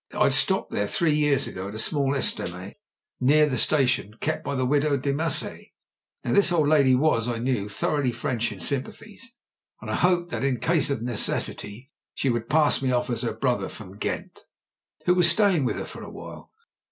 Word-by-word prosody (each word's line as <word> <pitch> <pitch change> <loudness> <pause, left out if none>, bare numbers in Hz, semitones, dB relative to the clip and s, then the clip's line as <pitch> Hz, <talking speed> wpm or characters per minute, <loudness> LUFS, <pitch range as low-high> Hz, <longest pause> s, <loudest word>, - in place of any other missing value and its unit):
I'd - - +2
stopped - - +2
there 100 - -1
three 160 +7 +1
years 150 -2 +2
ago 95 +1 -6
at 100 - -8
a - - -5
small 140 +3 +1
estaminet 90 -7 -2 0.5
near 150 +4 +4
the 140 -4 -2
station 125 -7 +1
kept 155 +7 -3
by 140 - -3
the 130 -1 0
widow 145 +2 +2
Demassiet. 140 +3 -1 0.6
Now 120 - -1
this 200 -2 +4
old 160 -4 +2
lady 140 -4 +4
was, 125 -4 +1
I 120 -1 -2
knew, 115 -4 -2
thoroughly 135 +4 -1
French 120 -2 -2
in 100 - -9
sympathies; 205 - -4 0.5
and - - -7
I - - 0
hoped 175 -1 +1
that, - - -3
in 135 -3 0
case 160 -3 +2
of 135 -5 -2
necessity, 120 +1 -2 0.2
she 135 - 0
would 115 -1 -3
pass 150 -2 +4
me 130 -1 0
off 125 0 0
as 115 -1 -2
her 120 - -2
brother 125 +2 -1
from 100 -3 -11
Ghent, 105 - -5 0.6
who 180 - +4
was 175 -1 +5
staying 180 -5 +3
with - - -1
her - - -5
for - - -10
a - - -8
while. - - -11
135 Hz, 195 wpm, -25 LUFS, 120-150 Hz, 0.6 s, was